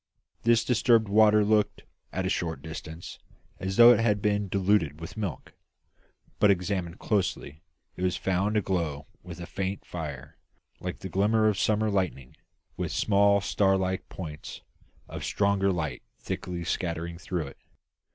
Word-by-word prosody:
This 115 0 +3
disturbed 115 -2 +3
water 105 +1 +5
looked, 105 -1 +1 0.3
at 95 0 -2
a - - 0
short 80 -7 -2
distance, 80 +1 -8 0.4
as 95 +1 -3
though 120 0 +10
it - - +1
had 105 -3 +2
been 105 0 0
diluted 95 -6 +1
with 80 - -8
milk; 105 -6 -5 0.9
but, 105 - +5
examined 90 -2 0
closely, 90 -7 -2 0.3
it - - -9
was 90 -1 +1
found 95 +3 0
to 105 - +3
glow 80 -6 -2 0.2
with 85 -1 -9
a 85 - -6
faint 95 +3 -4
fire, 75 -6 -7 0.4
like 90 0 -5
the 95 - -5
glimmer 105 +4 +2
of 105 -3 +1
summer 110 +1 +2
lightning, 90 -10 -2 0.4
with - - -2
small 100 0 +3
star 95 0 +2
like 95 0 -2
points 75 -5 -8 0.5
of - - -7
stronger 100 -1 +1
light 80 -8 -3 0.2
thickly 90 -1 -4
scattered 85 0 -3
through 85 -2 -3
it. 70 - -11
95 Hz, 150 wpm, -27 LUFS, 85-105 Hz, 0.9 s, though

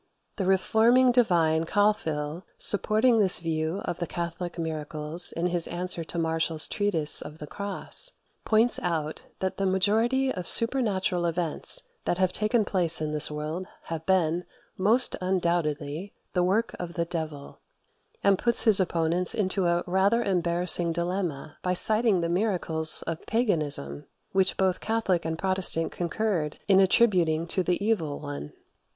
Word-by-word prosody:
The 195 - -2
reforming 225 +6 +3
divine 165 -9 +2
Calfhill, 170 -6 -1
supporting 220 +3 +4
this 190 -3 +5
view 160 +2 -3
of 175 - -4
the 175 - -3
Catholic 170 +1 -5
miracles 155 0 0
in 170 - -3
his 175 -1 +2
answer 175 0 -2
to 165 - -7
Martiall's 160 -1 -1
"Treatise 170 -8 +2
of 150 +1 -9
the 150 - -8
Cross," 200 - -2 0.3
points 225 +2 +3
out 160 -3 -3 0.2
that 190 0 -2
the 195 - 0
majority 225 +8 +1
of 180 -2 -6
supernatural 200 -8 +1
events 170 - 0 0.2
that 175 - 0
have 185 -1 +1
taken 215 +1 +1
place 175 -5 +2
in 155 -1 -3
this 150 0 +4
world 155 +5 -5 0.2
have 165 -1 -6
been, 175 -2 +1 0.3
most 220 +7 +2
undoubtedly, 170 -2 -2 0.2
the 180 - +1
work 205 +6 0
of 175 -1 -6
the 170 - -1
devil; 160 -4 -6 0.6
and 200 -1 +3
puts 235 -1 +4
his 215 -4 +6
opponents 170 0 0
into 190 -3 0
a 175 0 +1
rather 195 +6 +1
embarrassing 175 -2 0
dilemma 170 -4 -4
by 180 0 -1
citing 215 -1 +2
the 170 - -1
miracles 170 -4 +1
of 165 -1 -5
paganism, 150 - -1 0.3
which 190 -1 +1
both 190 -1 +1
Catholic 215 -7 -1
and 160 0 -3
Protestant 185 -3 -1
concurred 175 -3 -2
in 195 -1 +5
attributing 180 -5 +3
to 185 - 0
the 180 -1 0
evil 165 -10 -1
one. 145 - -7
180 Hz, 145 wpm, -26 LUFS, 160-200 Hz, 0.6 s, his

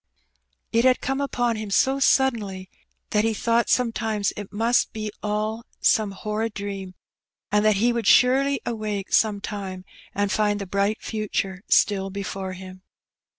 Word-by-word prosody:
It 230 +1 +3
had 255 0 +4
come 270 +1 -2
upon 245 -4 0
him 215 -1 -5
so 265 +7 +2
suddenly 215 -9 +1 0.4
that 210 0 +2
he 225 -1 +1
thought 230 +2 +1
sometimes 225 -4 0
it 205 -2 -8
must 230 +4 +1
be 215 -1 -4
all 215 +2 -2 0.2
some 215 -2 +3
horrid 210 +3 -3
dream, 195 -2 -6 0.6
and 210 0 +3
that 215 -1 +4
he 235 +5 +2
would 230 -3 -2
surely 270 +3 +4
awake 215 -4 -3
some 210 -2 +3
time 195 -3 -6 0.3
and 205 0 0
find 210 -1 +1
the 200 - -4
bright 200 +3 -1
future 200 -3 -3
still 195 -2 +3
before 195 -1 -5
him. 185 0 -10
210 Hz, 150 wpm, -24 LUFS, 200-230 Hz, 0.6 s, had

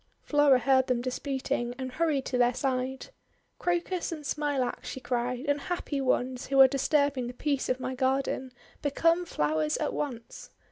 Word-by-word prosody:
Flora 290 -3 +5
heard 260 +1 +3
them 250 -2 +1
disputing 255 -1 -2
and 260 -1 -5
hurried 300 -1 0
to 255 - -3
their 245 0 +3
side. 260 0 -2 0.5
'Crocus 350 0 -1
and 310 -3 -6
Smilax!' 285 -4 -1
she - - -5
cried. 245 +1 -2
'Unhappy 290 0 -2
ones, 255 -1 0
who 275 0 +2
are 265 - +10
disturbing 275 -1 +1
the 245 - -7
peace 280 0 -1
of 255 0 0
my 255 0 -3
garden! 265 0 -1 0.3
Become 330 +5 +2
flowers 155 - 0
at - - -2
once!' 240 -6 -5
265 Hz, 155 wpm, -28 LUFS, 250-285 Hz, 0.5 s, are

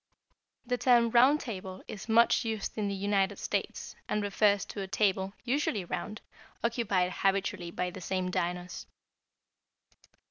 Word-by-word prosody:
The 245 0 -1
term 240 -2 +4
Round 260 +5 +6
Table 190 -7 -7
is 205 +2 -8
much 230 +1 +5
used 220 -3 -3
in 210 -2 -1
the 200 - -2
United 195 0 +1
States, - - -3
and 210 - 0
refers 205 0 +2
to 205 - -6
a 195 - -4
table, 190 -1 +1
usually 245 -6 0
round, 215 +4 -5 0.4
occupied 205 -6 +1
habitually 195 -2 0
by 180 +1 -3
the 185 - -9
same 185 0 -2
diners. 180 +1 -3
200 Hz, 140 wpm, -30 LUFS, 190-230 Hz, 0.4 s, Round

